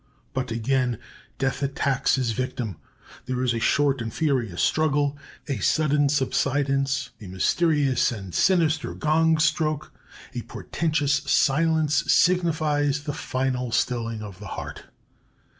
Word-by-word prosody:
But 130 -1 -2
again 120 +1 0 0.4
Death 135 0 -1
attacks 140 -1 +1
his 130 -4 0
victim. 115 -5 -3 0.5
There 130 0 -1
is 125 -2 +1
a 115 - -1
short 135 +2 +2
and 115 -1 -4
furious 125 - -1
struggle, 145 -2 +1 0.3
a 135 -6 -2
sudden 145 +5 +2
subsidence, 140 0 0
a 100 - -8
mysterious 140 - +2
and 95 -6 -7
sinister 160 -4 +2
gong 160 +1 +2
stroke; 155 -1 0 0.4
a - - -3
portentous 150 -3 -1
silence 155 +1 +2
signifies 155 -5 +2
the 145 -1 -3
final 130 -2 -2
stilling 115 -2 -1
of 100 -3 -9
the 105 - -8
heart. - - -7
140 Hz, 125 wpm, -25 LUFS, 125-155 Hz, 0.5 s, short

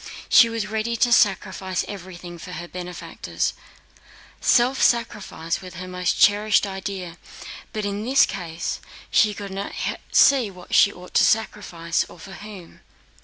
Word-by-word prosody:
She 235 -2 +7
was 230 -2 -2
ready 220 +2 -2
to 240 +1 +3
sacrifice 190 -3 +1
everything 175 -3 -9
for 180 - -9
her 175 0 -6
benefactors. 180 0 -4 0.9
Self 255 +2 +3
sacrifice 210 -8 0
was 185 -1 -10
her 185 +1 -7
most 180 0 -1
cherished 210 0 +4
idea 190 -3 -6 0.5
but 215 -2 -3
in 205 +1 -3
this 260 +4 +5
case 175 -3 -4 0.3
she 210 -1 +4
could 200 -1 -7
not 195 +1 -5 0.4
see 265 -6 +5
what 180 -2 -12
she 200 - +6
ought 180 -1 -13
to - - +5
sacrifice, 190 -6 0
or - - -13
for 195 +2 -11
whom. 200 -4 -11
195 Hz, 145 wpm, -23 LUFS, 180-215 Hz, 0.9 s, She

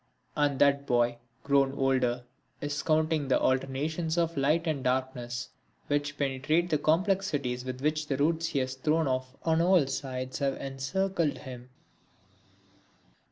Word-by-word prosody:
And 145 -2 +1
that 140 0 +3
boy, 120 -1 +2 0.3
grown 140 -1 +3
older, 130 -3 +1 0.4
is 145 0 -3
counting 155 -2 +1
the 130 - +3
alternations 150 +6 0
of 170 -1 +1
light 150 +5 +2
and 150 -5 -1
darkness 125 -2 -2 0.4
which 145 0 -1
penetrate 145 +5 0
the 150 - +2
complexities 155 -8 +1
with 130 0 -5
which 155 +1 0
the 135 - -1
roots 165 +3 +1
he 150 - -3
has 130 -1 0
thrown 155 +4 +1
off 130 0 -2
on 160 0 +2
all 175 -3 +4
sides 130 -1 -4
have 135 -1 0
encircled 155 +5 -1
him. 125 -2 -9
140 Hz, 140 wpm, -29 LUFS, 130-160 Hz, 0.4 s, all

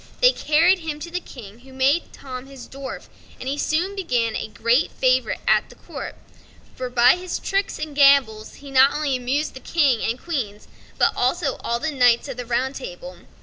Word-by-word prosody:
They - - +6
carried 335 0 +3
him 315 -3 -5
to 340 - -7
the 360 - -2
King, 225 - -12
who 265 +2 -17
made 270 +5 +1
Tom 255 -1 -9
his 270 -2 -11
dwarf, 270 0 -8 0.4
and 255 - -7
he 275 - -1
soon 355 +8 0
became 245 - -1
a - - -3
great 230 +6 +1
favorite 255 -1 +1
at - - +2
court; - - -7 0.6
for 255 -1 -5
by 245 +5 +5
his 360 0 -4
tricks 390 0 -2
and 305 -2 -6
gambols 275 -7 +4
he 280 -1 -12
not 270 +1 +5
only 295 -3 0
amused 260 +5 -1
the 260 - -9
King 275 -6 +1
and 235 +3 -1
Queen, 245 -12 -4 0.4
but - - +2
also 270 +2 0 0.2
the 315 +3 -2
Knights 245 -2 +3
of 270 -3 -6
the 245 -1 -6
Round 255 +3 0
Table. - - -8
270 Hz, 190 wpm, -22 LUFS, 250-310 Hz, 0.6 s, They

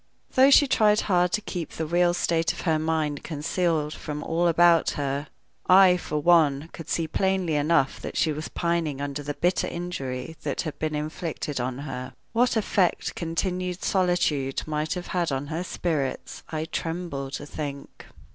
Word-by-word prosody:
Though 265 +1 +6
she 285 +1 +7
tried 215 -5 +3
hard 180 -2 +2
to 215 - +1
keep 175 -6 -5
the 160 - -3
real 175 +2 +2
state 165 -1 +1
of - - -8
her 160 -3 +1
mind 155 -2 -1
concealed 155 0 -1
from 150 0 -6
all 170 +2 +1
about 170 0 +5
her, 140 +1 -2 0.4
I, 185 -1 +8
for 155 -3 -3
one, 155 -2 +3
could 165 - -9
see 165 -1 0
plainly 190 0 0
enough 150 -2 +2
that - - -6
she 160 - +2
was 155 +1 -4
pining 170 -5 -1
under 140 0 -3
the 145 0 -4
bitter 180 +1 +1
injury 160 -4 -5
that 145 -3 -2
had 155 - -6
been 155 -1 -1
inflicted 150 -1 -4
on 125 0 -3
her. 130 -3 -6 0.2
What 240 0 +3
effect 195 -4 +1
continued 180 +2 -2
solitude 175 -8 +1
might 155 +4 -2
have 180 -1 -5
had 175 -4 0
on 135 +1 -2
her 170 +3 -2
spirits 155 -7 -3
I 155 0 -3
tremble 165 -5 -4
to 145 - -5
think. 145 -2 -7
160 Hz, 170 wpm, -26 LUFS, 145-175 Hz, 0.4 s, I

